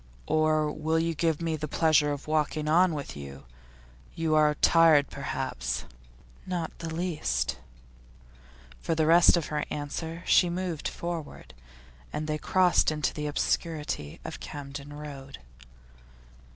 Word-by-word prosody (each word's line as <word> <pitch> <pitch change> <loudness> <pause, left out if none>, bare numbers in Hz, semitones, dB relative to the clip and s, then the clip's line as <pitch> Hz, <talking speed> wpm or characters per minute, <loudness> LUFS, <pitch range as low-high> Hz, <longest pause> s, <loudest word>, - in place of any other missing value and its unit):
'Or 155 -1 +2
will 155 +2 -1
you 165 +1 +1
give 165 0 0
me 165 -1 0
the 155 0 -4
pleasure 150 -1 +3
of 145 -1 -5
walking 155 0 0
on 170 +2 +4
with 140 -2 -6
you? 70 -2 -9 0.7
You 160 -1 0
are 150 -1 +4
tired, 160 -3 +5
perhaps?' 60 +1 -3 0.6
'Not 175 -3 -2
the 165 -1 -5
least.' 65 - -1 1.2
For 165 - -1
the 160 -1 +2
rest 170 +2 +6
of 165 - -1
her 150 -1 0
answer 160 +3 -5
she 180 - +5
moved 175 -3 -3
forward, 165 - -6 0.6
and 155 - -3
they 155 0 -2
crossed 185 +1 +3
into 150 -1 -1
the 150 -1 -4
obscurity 150 - -2
of - - -6
Camden 140 0 -8
Road. 140 -2 -9
155 Hz, 135 wpm, -28 LUFS, 145-165 Hz, 1.2 s, rest